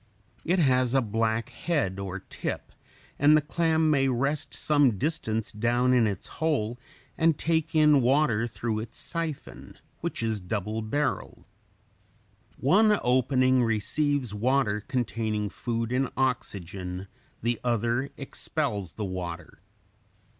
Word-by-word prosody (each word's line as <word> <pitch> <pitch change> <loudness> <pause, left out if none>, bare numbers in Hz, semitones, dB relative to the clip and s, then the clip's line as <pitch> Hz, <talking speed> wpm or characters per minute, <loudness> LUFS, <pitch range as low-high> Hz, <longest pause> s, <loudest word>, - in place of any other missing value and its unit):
It 175 +3 +1
has 130 -5 +3
a 135 - +5
black 115 +1 0
head 140 - -1
or 95 -1 -5
tip - - -5 0.5
and 150 +2 +6
the - - +5
clam 160 +1 +1
may 135 -2 +3
rest 140 +4 -1
some 145 -8 +3
distance 115 - -2
down 120 +3 +2
in 120 -3 +4
its 100 -3 -4 0.2
hole 125 -7 0 0.4
and 160 -2 +4
take 160 -1 0
in 150 -3 +6
water 125 -3 +2
through 115 -1 -3
its 115 +1 -7
siphon, 165 -4 -5 0.2
which - - -3
is 110 -3 -1
double 105 +4 -3
barreled. 140 +6 -2 1.1
One 210 - +4
opening 130 +1 +3
(in.) 125 - +4
receives 125 +3 0
water 115 -1 +1
containing 110 -3 -2
food 115 +2 -3
and 130 +1 +1
oxygen; 95 -7 -2 0.4
the 120 0 0
other 120 +1 +1
(ex.) 135 - -6
expels 105 - -2
the 105 - -4
water. 90 -3 -6
125 Hz, 130 wpm, -27 LUFS, 110-145 Hz, 1.1 s, and